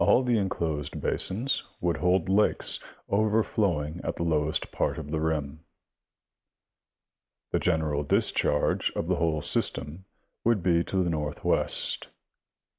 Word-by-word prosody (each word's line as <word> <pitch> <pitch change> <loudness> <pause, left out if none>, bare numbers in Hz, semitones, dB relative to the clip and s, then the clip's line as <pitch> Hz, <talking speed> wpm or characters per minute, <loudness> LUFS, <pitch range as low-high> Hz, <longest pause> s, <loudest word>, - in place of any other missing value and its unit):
All 125 - +4
the 120 -3 +2
enclosed 80 -7 -2
basins 120 +8 +1 0.2
woUld 85 -2 0
hold 90 -1 +2
lakes, 100 +3 +2 0.3
overflowing 100 -7 +1
at - - -2
the - - -3
lowest 80 -1 0
part - - -1
of 75 -2 -7
the 80 - 0
rim. 80 -2 -2 1.9
The - - +1
general 80 -4 0
discharge 75 0 +1
of - - -2
the - - +1
whole 80 -2 0
system 80 +6 -1 0.4
would 115 -6 +2
be 85 -1 +3
to 95 -1 0
the 85 - -1
northwest. 75 -2 0
85 Hz, 125 wpm, -27 LUFS, 75-95 Hz, 1.9 s, All